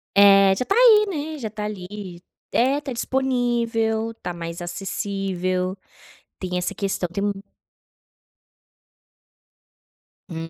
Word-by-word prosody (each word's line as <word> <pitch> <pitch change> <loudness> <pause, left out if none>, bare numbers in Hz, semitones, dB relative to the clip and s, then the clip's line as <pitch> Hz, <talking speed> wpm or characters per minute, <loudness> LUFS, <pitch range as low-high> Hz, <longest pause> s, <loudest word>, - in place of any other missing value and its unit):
É, 195 -1 +7
já 220 - -1
está 395 - 0
aí 450 -3 +7
né, 310 -4 -4
já 235 - -4
está 210 0 -5
ali 190 -3 -7 0.3
é, 265 +4 +3
está 290 -3 -5
disponível, 235 -3 0
tá 180 - -4
mais 170 0 -6
acessível, 185 0 -2 0.6
tem 180 -1 -3
essa 180 - -2
questão 195 -3 -2
do 200 +3 -1 3.0
Hum. 165 -1 -6
205 Hz, 110 wpm, -23 LUFS, 185-245 Hz, 3.0 s, É